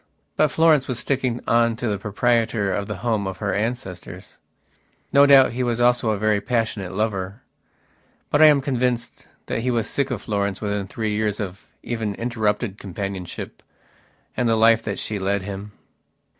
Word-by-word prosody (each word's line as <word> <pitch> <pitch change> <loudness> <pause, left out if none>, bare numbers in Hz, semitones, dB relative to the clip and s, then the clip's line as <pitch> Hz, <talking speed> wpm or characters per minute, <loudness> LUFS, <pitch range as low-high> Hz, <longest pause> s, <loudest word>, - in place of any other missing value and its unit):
But 155 - +4
Florence 155 -3 +3
was 130 - -2
sticking 125 -1 -1
on 115 0 +3
to 120 +1 -3
the 100 -2 -1
proprietor 110 -1 +1
of 100 0 -2
the 105 - -4
home 110 -4 0
of 95 -1 -5
her 100 -2 -2
ancestors. 105 -4 -5 0.7
No 140 +1 +7
doubt 135 -2 +7
he 125 +2 -3
was 120 -1 0
also 120 -1 +3
a 105 - +1
very 105 0 +1
passionate 110 -5 -2
lover. 100 +2 -3 0.9
But 145 - +3
I 155 - +10
am 145 -2 +5
convinced 125 -3 -2 0.2
that - - -2
he 125 - -1
was 115 -3 0
sick 140 -1 0
of - - -4
Florence 100 -2 -1
within 100 -2 -2
three 110 +1 -3
years 105 -1 -1
of 95 -3 -6 0.2
even 110 -4 -3
interrupted 110 -3 -1
companionship 95 -2 -6 0.7
and 120 -2 +1
the 115 - +3
life 115 0 +5
that 100 - -4
she 105 -2 -3
led 100 0 -1
him.... 100 +1 -7
110 Hz, 170 wpm, -22 LUFS, 100-120 Hz, 0.9 s, I